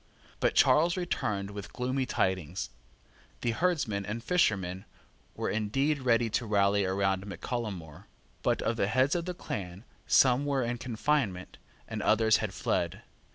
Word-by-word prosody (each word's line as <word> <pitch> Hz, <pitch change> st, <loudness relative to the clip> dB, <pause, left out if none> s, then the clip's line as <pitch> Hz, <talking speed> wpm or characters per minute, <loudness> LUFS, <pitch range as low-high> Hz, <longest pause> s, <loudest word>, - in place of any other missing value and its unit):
But -, -, +1 dB
Charles 170 Hz, +5 st, +4 dB
returned 105 Hz, -, -2 dB
with 100 Hz, -3 st, -8 dB
gloomy 130 Hz, +1 st, -1 dB
tidings. 95 Hz, -4 st, -1 dB, 0.7 s
The 120 Hz, -, +1 dB
herdsmen 135 Hz, -, 0 dB
and 110 Hz, +4 st, -5 dB
fishermen 95 Hz, -, +1 dB, 0.5 s
were -, -, -2 dB
indeed 135 Hz, +8 st, 0 dB
ready 120 Hz, -2 st, +3 dB
to 115 Hz, -, -1 dB
rally 100 Hz, -1 st, +3 dB
round 95 Hz, 0 st, 0 dB
Mac 95 Hz, -3 st, -8 dB
Callum 115 Hz, -5 st, -2 dB
More; 80 Hz, +3 st, -12 dB, 0.3 s
but, -, -, +1 dB
of 115 Hz, -, 0 dB
the 100 Hz, -, +1 dB
heads 130 Hz, +6 st, +2 dB
of 170 Hz, -1 st, -1 dB
the 180 Hz, -1 st, -4 dB
clan, 95 Hz, -, -6 dB, 0.2 s
some 130 Hz, +1 st, +5 dB
were 140 Hz, -2 st, 0 dB
in 120 Hz, 0 st, -2 dB
confinement, 115 Hz, -6 st, -1 dB, 0.3 s
and -, -, -4 dB
others 110 Hz, -1 st, +4 dB
had 110 Hz, -3 st, -3 dB
fled. -, -, -2 dB
110 Hz, 155 wpm, -30 LUFS, 100-130 Hz, 0.7 s, some